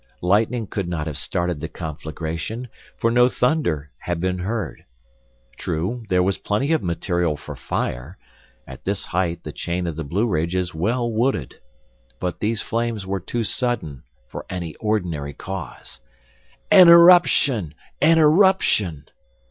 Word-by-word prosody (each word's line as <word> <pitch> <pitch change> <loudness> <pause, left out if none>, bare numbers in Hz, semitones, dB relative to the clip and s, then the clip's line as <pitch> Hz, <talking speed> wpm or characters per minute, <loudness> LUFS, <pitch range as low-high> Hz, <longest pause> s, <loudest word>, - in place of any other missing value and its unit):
Lightning 110 +5 +2
could 100 -2 -4
not 80 -3 -3
have 75 -3 -5
started 85 +2 -2
the 80 - -4
conflagration; 80 +9 -5 0.3
for 115 - +1
no 125 +1 +5
thunder 105 - 0
had 85 -1 -3
been 90 +1 -1
heard. 100 +1 -4 0.7
True, 95 +9 -3
there 90 -1 +3
was 95 +1 0
plenty 110 +9 -1
of 160 - +1
material 85 -2 -1
for - - -9
fire; 65 +10 -4 0.5
at 65 -1 -11
this 100 0 -2
height 85 -2 -2
the - - -6
chain 90 +1 -3
of 85 -3 -3
the 80 - -4
Blueridge 85 0 -1
is 90 -1 -1
well 115 +9 -1
wooded. 110 - -1 0.6
But 90 -1 -3
these 110 0 -1
flames 115 -3 -2
were 95 +1 -2
too 115 +6 -3
sudden 110 - -1 0.3
for - - -8
any 85 -4 -5
ordinary 85 -10 -2
cause. 90 -14 -8 0.7
"An 180 -2 +9
eruption! 170 - +6 0.3
An 165 +1 +5
eruption!" 155 - +3
95 Hz, 140 wpm, -22 LUFS, 85-115 Hz, 0.7 s, An